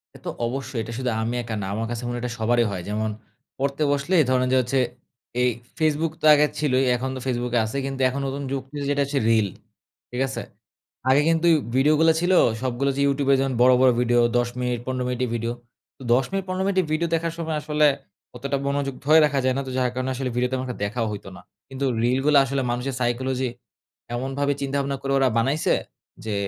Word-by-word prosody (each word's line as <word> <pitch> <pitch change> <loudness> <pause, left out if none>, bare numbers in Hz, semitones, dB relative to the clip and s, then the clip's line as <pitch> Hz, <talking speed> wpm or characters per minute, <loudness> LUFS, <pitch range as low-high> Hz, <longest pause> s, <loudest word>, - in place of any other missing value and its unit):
এ - - -9
তো - - -2 0.2
অবশ্যই। 130 -1 -4
এটা 115 - -7
শুধু 130 -1 -1
আমি 115 +2 -2
একা 115 -1 -4
না, - - -3
আমার 110 +2 -2
কাছে 120 0 -4
মনে 120 - -3
হয় - - -5
এটা 125 - -2
সবারই 120 +1 +2
হয়। 95 -3 -4
যেমন, 110 +1 -1 0.5
পড়তে 140 +2 -1
বসলে 145 +6 -1 0.2
ধরেন 130 0 +2
যে 130 - +4
হচ্ছে, 130 +2 0 0.6
এই 125 - +4 0.3
Facebook 155 0 +1
তো - - -2
আগে 150 0 +5
ছিলোই, 135 -3 +2
এখন 130 +2 -3
তো - - -5
Facebook 125 -1 -1
কে - - +4
আছে। 110 +5 -4
কিন্তু 135 -1 -4
এখন 140 +2 -3
নতুন 140 +1 -4
যুগ, 135 -1 -1 0.3
যেটা 145 0 +1
হচ্ছে 140 0 -1
রিল, 110 -2 +3 0.6
ঠিক 125 - -2
আছে? - - -4 0.7
আগে 135 +2 +5
কিন্তু 165 +1 +2
উই - - +5 0.2
ভিডিওগুলা 155 +4 +4
ছিল 180 +2 +1 0.3
সবগুলা 130 +2 0
যে - - +1
YouTube 140 0 0
এ - - +6
যেমন 135 -1 0
বড়, 125 0 +7
বড় 130 - +6
ভিডিও 120 0 +3 0.2
১০ 120 0 +1
মিনিট, 125 -1 -1
১৫ 130 -1 -1
মিনিটের 125 -1 -1
ভিডিও। 115 +1 -2 0.4
তো - - -19
১০ 130 +2 +3
মিনিট, 195 -1 -1
১৫ 185 +1 -2
মিনিটের 185 -4 +1
ভিডিও 160 +2 +1
দেখার 165 0 -2
সময় 160 -2 -2
আসলে, 150 0 +2 0.5
অতটা 140 +3 -2
মনযোগ 140 -1 -1
ধরে 155 +2 +7
রাখা 145 -2 0
যায় 130 - +2
না। 140 - 0
তো - - -4
যার 125 -1 +2
কারণে 130 +1 -2
আসলে 130 0 -2
ভিডিও 125 +1 +1
তেমন 130 -1 -1
একটা 125 - -5
দেখাও 115 +3 -2
হইতো 100 -2 -7
না। - - -12 0.3
কিন্তু 135 +1 -3 0.2
রিলগুলা 135 +4 +4
আসলে 135 +1 -1
মানুষের 125 +2 -3
সাইকোলজি, 130 +1 0 0.7
এমনভাবে 135 +3 -1
চিন্তা-ভাবনা 140 0 -1
করে 135 0 -3
ওরা 135 - +3
বানাইছে 135 +7 +2 0.5
যে, 110 - -2
130 Hz, 215 wpm, -24 LUFS, 125-140 Hz, 0.7 s, বড়